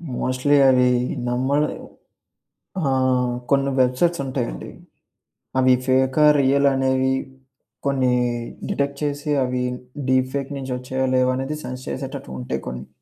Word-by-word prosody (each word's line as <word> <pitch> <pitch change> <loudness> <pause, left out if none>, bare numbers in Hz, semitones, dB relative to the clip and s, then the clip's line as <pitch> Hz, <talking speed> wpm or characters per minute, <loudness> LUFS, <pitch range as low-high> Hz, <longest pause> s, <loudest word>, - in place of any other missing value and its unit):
Mostly 130 +4 +1
అవి 125 -1 +4 0.4
నమ్మడం 135 +5 +1 1.1
ఆ! - - -3 0.7
కొన్ని 140 0 +2
వెబ్‌సైట్స్ 135 +7 +2
ఉంటా‌యండి. - - -4 0.9
అవి 130 0 +5
ఫేకా, 130 +3 +3
రియలనేవి 135 -1 +2 0.7
కొన్ని 130 -2 +2 0.6
డిటెక్ట్ 140 0 -1
చేసి 145 0 -3
అవి 125 0 -1 0.5
డీప్ 130 0 +2
ఫేక్ 140 0 -3
నుంచి 130 -1 -4
ఒచ్చాయా 130 +1 -2
లేవా 130 0 +3
అనేది 135 +3 -3
సెన్స్ 125 +1 -6
చేసేటట్టుగా 130 - -6
ఉంటాయి 65 - -4
కొన్ని. 65 +1 -6
130 Hz, 110 wpm, -22 LUFS, 125-140 Hz, 1.1 s, అవి